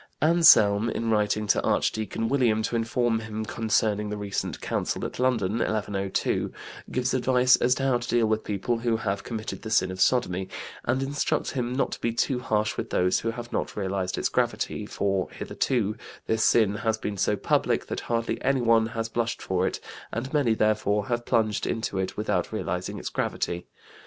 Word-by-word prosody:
Anselm, 140 -10 +6
in 115 0 -1
writing 105 0 +1
to 100 - +2
Archdeacon 110 +1 0
William 115 -5 +2
to 115 - -2
inform 115 0 +1
him 110 -1 -5
concerning 105 -2 0
the 105 - -3
recent 100 -1 -3
Council - - -2
at - - -6
London 115 -4 +1
(1102), 100 -3 -1 0.4
gives 125 0 -1
advice 125 0 +4
as 125 +1 +2
to 135 - -3
how 130 -3 +2
to 120 - -6
deal 120 -1 +3
with 110 0 0
people 105 +3 -1
who 115 -1 +1
have 100 -2 -2
committed 110 -2 -5
the 110 - -6
sin 95 -4 +2
of 95 0 -5
sodomy, 95 -7 +2 0.4
and 130 +3 +1
instructs 140 +1 -1
him 125 -2 -2
not 135 - 0
to - - -6
be 115 - 0
too 125 +3 0
harsh 110 -3 0
with - - -3
those 90 0 +2
who 115 - -2
have 120 +1 -6
not - - -2
realized 95 -2 -2
its - - +1
gravity, - - -1
for 95 -2 -1
hitherto 110 -5 -1 0.3
"this 110 0 +1
sin 105 -3 +4
has 110 0 0
been 105 -2 -4
so 105 +2 +1
public - - +1
that - - -4
hardly 115 -1 -2
anyone 115 -4 +3
has 115 0 -3
blushed 115 0 -2
for 95 0 0
it, - - -3 0.3
and 130 +5 -4
many, 135 -7 +3
therefore, 105 -1 +1
have 120 0 -1
plunged 110 -2 +1
into 110 -4 -2
it 95 0 -3
without 105 -4 -1
realizing 90 -4 -3
its - - -4
gravity." 85 0 -2
110 Hz, 185 wpm, -26 LUFS, 105-120 Hz, 0.4 s, Anselm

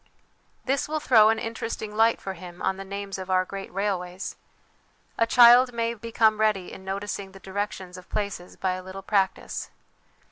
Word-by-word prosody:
This 275 +2 0
will 310 0 -1
throw 220 -7 +6
an 225 - +2
interesting 225 -1 -5
light 225 +1 +4
for 195 - -5
him 175 -1 -11
on 190 - -1
the 195 - -6
names 200 0 -5
of 190 0 -7
our 185 0 +3
great 195 +1 -7
railways. 185 -2 -3 0.8
A 230 - +2
child 245 +1 +7
may 230 0 -1
become 220 -1 +1
ready 210 -4 +1
in 190 - -10
noticing 195 0 -4
the 195 - -12
directions 190 -1 -5
of 180 - -17
places 200 -4 -4
by 190 - -1
a 185 0 -4
little 190 +1 -9
practice. 195 -1 -1
200 Hz, 175 wpm, -26 LUFS, 190-225 Hz, 0.8 s, child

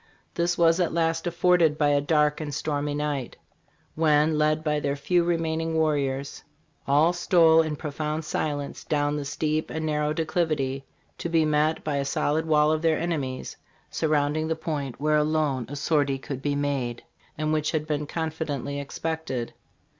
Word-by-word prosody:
This 175 0 0
was 165 +1 +4
at 175 -3 +1
last 165 0 0
afforded 170 -3 +3
by 150 -2 +3
a 145 0 +3
dark 150 0 +2
and 150 -1 -4
stormy 145 0 -2
night, 145 -4 -3 0.6
when, 155 0 +3
led 155 +1 +1
by 150 -1 +1
their 140 -1 -1
few 175 +5 +1
remaining 165 -1 -1
warriors, 140 -3 -1 0.4
all 150 +5 +4
stole 170 -2 +5
in 155 -2 -2
profound 150 +1 -4
silence 145 -2 -3
down 145 -1 0
the 145 -1 -3
steep 155 +2 -1
and 160 0 -3
narrow 150 -1 0
declivity 155 -4 -1 0.3
to 170 - -3
be 165 -1 +3
met 155 +1 +1
by 150 -2 -1
a 140 - 0
solid 155 +3 0
wall 150 -1 +4
of 155 0 0
their 165 -1 +2
enemies 145 -7 -3 0.3
surrounding 155 0 0
the 160 - 0
point 150 -5 -4
where 150 +1 +2
alone 150 -5 0
a 145 - -6
sortie 145 -2 +1
could 135 -1 -6
be 145 +1 -1
made, 140 -4 -2 0.3
and 155 0 0
which 155 -1 0
had 155 -2 -1
been 150 -1 -2
confidently 155 -4 -3
expected. 140 -3 -4
150 Hz, 165 wpm, -26 LUFS, 145-160 Hz, 0.6 s, stole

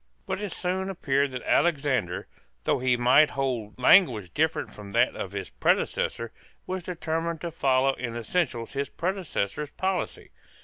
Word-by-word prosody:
But 190 +1 -3
it 205 -3 -3
soon 190 +2 -2
appeared 140 -6 +1
that 130 -1 -6
Alexander, 135 - +1 0.4
though - - +1
he 125 -1 +2
might 125 +5 +5
hold 125 -6 -3
language 125 - +5
different 160 +1 0
from 105 -1 -10
that - - +3
of - - -5
his - - -5
predecessor, 115 -1 0 0.3
was 185 0 -3
determined 165 -1 -3
to 170 - -4
follow 135 -2 +2
in 120 -3 -5
essentials 120 -1 -1
his 140 0 -2
predecessor's 150 - -2
policy. 190 0 -3
140 Hz, 145 wpm, -27 LUFS, 120-175 Hz, 0.4 s, might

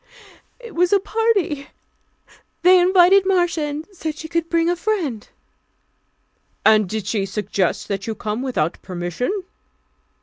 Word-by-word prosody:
"It 470 -4 -11
was 350 +1 +2
a 400 - +5
party. 390 -9 0 1.0
They 365 +1 +7
invited 370 +1 +5
Marcia, 355 -4 +1
and 295 +2 -5
said 315 -5 -5
she 315 - -7
could 335 0 -2
bring 335 -1 +2
a 350 - +2
friend." 345 - -2 1.4
"And 215 -3 +5
did 215 -1 -3
she 205 0 -1
suggest 195 -2 -2
that 195 +1 -4
you 220 - -3
come 215 +2 -4
without 240 - -2
permission?" 185 - -3
320 Hz, 135 wpm, -21 LUFS, -, 1.4 s, They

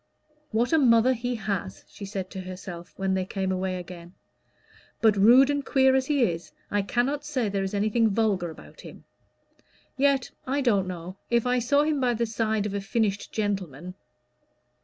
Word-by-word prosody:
"What 235 +6 0
a 320 - +5
mother 245 -1 +5
he 245 0 -3
has!" 195 - -4
she 200 - -9
said 195 -1 -5
to 190 - -6
herself 180 -2 -8
when 195 -1 0
they 190 0 0
came 190 0 -3
away 185 0 -1
again; 175 0 -9 0.8
"but, 220 -2 +4
rude 245 +8 +6
and 285 -1 -1
queer 265 -1 +3
as 265 0 +1
he 285 -4 +2
is, 170 -5 -2 0.2
I 205 - +2
cannot 255 +8 -1
say 265 -7 -1
there 195 0 -1
is 195 +1 -3
anything 215 +2 +2
vulgar 200 -4 0
about 160 - -13
him. - - -12 0.9
Yet 275 -1 +2 0.2
I 280 +2 0
don't 205 -8 +2
know 180 +1 -7
if 235 0 +2
I 250 0 +2
saw 285 +5 +2
him 300 -1 0
by 245 -2 +1
the 235 +1 0
side 220 -1 -1
of 205 - -3
a 200 - -2
finished 205 -1 -1
gentleman." 185 -6 -3
215 Hz, 180 wpm, -26 LUFS, 190-250 Hz, 0.9 s, rude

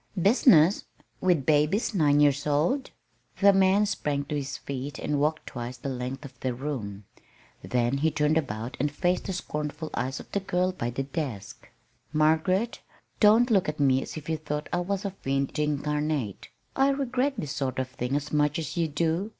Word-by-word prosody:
"Business! 195 - +5 0.3
with 175 -7 +2
babies 155 - +2
nine 145 -6 +3
years 145 0 +3
old!" 165 - +1 0.5
The 200 0 +6
man 195 +2 +4
sprang 145 -7 -2
to 150 - -4
his 140 -1 -3
feet 140 +1 -5
and 145 -1 -1
walked 155 +2 0
twice 120 0 -6
the 135 - -5
length 130 +2 -4
of 130 -2 -12
the 130 -2 -2
room; 115 -8 -5 0.6
then 125 +2 0
he 160 +3 +3
turned 150 0 +1
about 125 -5 -2
and 145 +2 0
faced 175 +4 0
the 190 - -3
scornful 150 -2 -4
eyes 130 +2 -2
of - - -12
the 200 - 0
girl 185 -1 0
by 120 -10 -3
the 130 +3 -3
desk. 135 - -6 0.4
"Margaret, 160 +8 +2 0.4
don't 225 +3 +5
look 195 -7 +3
at 150 - -5
me 135 -2 +3
as - - -7
if 150 - -8
you 160 -1 0
thought 150 -1 -4
I 175 - +2
was 195 +3 -2
a 200 - -1
fiend 140 -4 -2
incarnate. 150 -5 -1 0.3
I 270 +1 +4
regret 270 0 0
this 150 -9 -4
sort 135 -3 -2
of 130 -1 -1
thing 125 +1 -3
as 145 +1 -3
much 150 -1 +2
as 165 +2 -4
you 170 -2 +1
do. 165 +6 -1
150 Hz, 185 wpm, -27 LUFS, 135-180 Hz, 0.6 s, The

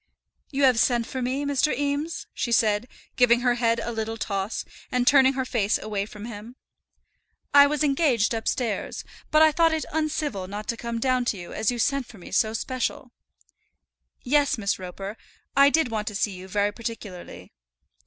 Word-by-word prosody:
"You 280 0 -1
have 255 -4 +5
sent 240 -1 +2
for 260 +1 -5
me, 260 +3 -1
Mr. 285 +1 +1
Eames," 290 +3 -2
she 240 - -3
said, 220 0 +2 0.3
giving 245 -1 +5
her 245 0 +3
head 235 -1 +1
a 235 - -3
little 225 0 -3
toss, 200 -1 -3 0.3
and 250 -1 +1
turning 270 -1 +6
her 260 -1 -2
face 220 -4 +1
away 205 -2 -3
from 210 -1 -9
him. 230 +1 -9 1.0
"I 285 0 +8
was 300 0 0
engaged 275 -7 +2
upstairs, 225 -1 -2 0.3
but 310 +1 +5
I 315 - +6
thought 330 +1 +3
it 315 - -3
uncivil 300 -10 -2
not 205 +2 -6
to 235 - 0
come 235 0 -4
down 255 0 +1
to 220 - -1
you 175 -1 -9
as 220 - 0
you 245 - -1
sent 275 +2 0
for 225 - -14
me 180 - -12
so 220 +2 +2
special." 250 +2 -3 1.1
"Yes, 285 +1 +2
Miss 200 -3 -1
Roper, 195 +3 -7 0.4
I 280 0 +7
did 315 -5 +1
want 215 -1 -2
to 210 - -4
see 205 +1 0
you 185 0 -9
very 205 +2 0
particularly." 220 -5 -8
235 Hz, 185 wpm, -25 LUFS, 210-275 Hz, 1.1 s, I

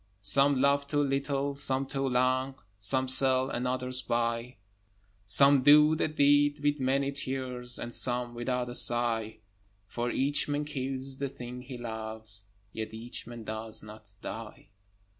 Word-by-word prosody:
Some 135 +7 +3
love 140 +1 +2
too 145 0 +1
little, 140 0 -1
some 135 -1 +1
too 135 0 -2
long, 130 +1 +1 0.2
Some 130 +6 +1
sell, 130 0 +3
and 125 +1 -2
others 130 0 +1
buy; 115 +1 -2 0.7
Some 140 +6 +5
do 150 +3 +6
the 155 - 0
deed 145 -1 +3
with 145 0 0
many 135 +1 0
tears, 130 -3 -3
And 120 - -6
some 120 -1 +2
without 125 +1 -2
a 120 - -6
sigh: 115 -3 +2 0.4
For 120 +4 -3
each 140 +4 +1
man 145 0 -2
kills 135 -2 -3
the 140 -1 -2
thing 125 -2 -8
he 125 0 -9
loves, 110 -3 -4 0.3
Yet 110 0 -5
each 115 +1 -6
man 120 -1 -9
does 110 0 -4
not 105 -1 -13
die. 115 -1 -8
130 Hz, 150 wpm, -29 LUFS, 120-140 Hz, 0.7 s, do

